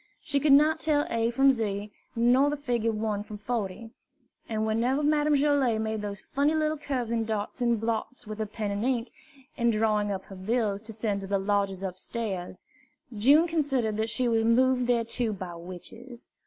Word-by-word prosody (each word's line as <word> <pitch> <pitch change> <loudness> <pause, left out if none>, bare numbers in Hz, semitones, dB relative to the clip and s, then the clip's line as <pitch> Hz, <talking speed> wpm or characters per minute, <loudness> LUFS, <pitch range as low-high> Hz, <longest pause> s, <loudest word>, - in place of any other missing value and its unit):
She 285 -1 0
could 290 +1 +3
not 305 +3 +5
tell 295 -2 +2
A 230 0 +1
from 270 +3 +4
Z, 210 -4 -3 0.2
nor 245 +4 +4
the 295 - -2
figure 240 -5 0
1 215 -1 -2
from 210 0 -8
40; 225 0 -4 0.6
and 220 -1 -1
whenever 240 +6 +1
Madame 300 0 +3
Joilet 275 -5 +2
made 220 -1 -2
those 200 -2 -5
funny 285 +3 +2
little 310 0 +1
curves 255 -6 -3
and 230 -1 0
dots 215 +3 -3
and 235 -2 +2
blots 230 +3 -3
with 215 0 -7
pen 210 -2 -3
and 200 +1 -2
ink, 245 -2 0 0.5
in 235 -1 +2
drawing 215 -2 +1
up 190 -1 -3
her 195 - -11
bills 205 +1 -1
to 225 0 -9
send 210 -2 -2
to 195 - -6
the 200 0 +1
lodgers 195 -1 0
upstairs, 190 0 -5 0.5
June 280 +10 +5
considered 270 -10 0
that 220 +1 0
she 250 +2 0
was 225 -1 +2
moved 250 +2 +3
thereto 235 -1 0
by 185 -3 -6
witches. 185 +8 -10
230 Hz, 180 wpm, -27 LUFS, 210-260 Hz, 0.6 s, not